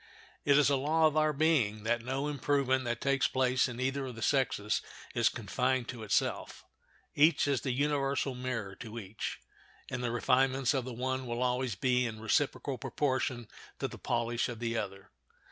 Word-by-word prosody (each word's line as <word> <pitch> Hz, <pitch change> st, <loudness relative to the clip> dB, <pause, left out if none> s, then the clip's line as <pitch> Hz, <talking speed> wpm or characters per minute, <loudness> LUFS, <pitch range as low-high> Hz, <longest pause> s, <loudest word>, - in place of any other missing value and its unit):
It 140 Hz, -1 st, +5 dB
is 145 Hz, -1 st, +5 dB
a 140 Hz, -, +3 dB
law 155 Hz, +4 st, +2 dB
of 155 Hz, -1 st, +3 dB
our 155 Hz, 0 st, +3 dB
being 140 Hz, -9 st, +2 dB
that 120 Hz, +1 st, +1 dB
no 135 Hz, +3 st, -2 dB
improvement 140 Hz, -2 st, +1 dB
that 120 Hz, -1 st, -2 dB
takes 140 Hz, 0 st, +2 dB
place 130 Hz, 0 st, +2 dB
in 125 Hz, -1 st, -7 dB
either 135 Hz, +1 st, -1 dB
of 125 Hz, -, -7 dB
the 110 Hz, -, -5 dB
sexes 125 Hz, -7 st, +1 dB, 0.3 s
is -, -, +3 dB
confined 130 Hz, -1 st, -1 dB
to 120 Hz, -3 st, -6 dB
itself; 105 Hz, -2 st, -1 dB, 0.5 s
each 150 Hz, 0 st, +4 dB
is 140 Hz, -3 st, +1 dB
the 130 Hz, -, -1 dB
universal 140 Hz, 0 st, 0 dB
mirror 125 Hz, -6 st, -4 dB
to 115 Hz, 0 st, -8 dB
each, 105 Hz, -1 st, -5 dB, 0.5 s
and 130 Hz, -1 st, -3 dB
the 120 Hz, -, 0 dB
refinements 130 Hz, +2 st, +2 dB
of 130 Hz, -3 st, -1 dB
the 130 Hz, -, -5 dB
one 130 Hz, +1 st, -2 dB
will 120 Hz, +1 st, -1 dB
always 125 Hz, -2 st, 0 dB
be 125 Hz, +3 st, +2 dB
in 110 Hz, -1 st, -6 dB
reciprocal 130 Hz, +3 st, 0 dB
proportion 130 Hz, -3 st, -1 dB, 0.3 s
to -, -, -2 dB
the -, -, -10 dB
polish 120 Hz, 0 st, -1 dB
of 120 Hz, -, -5 dB
the 115 Hz, 0 st, -2 dB
other. 95 Hz, -3 st, -5 dB
130 Hz, 180 wpm, -31 LUFS, 120-140 Hz, 0.5 s, It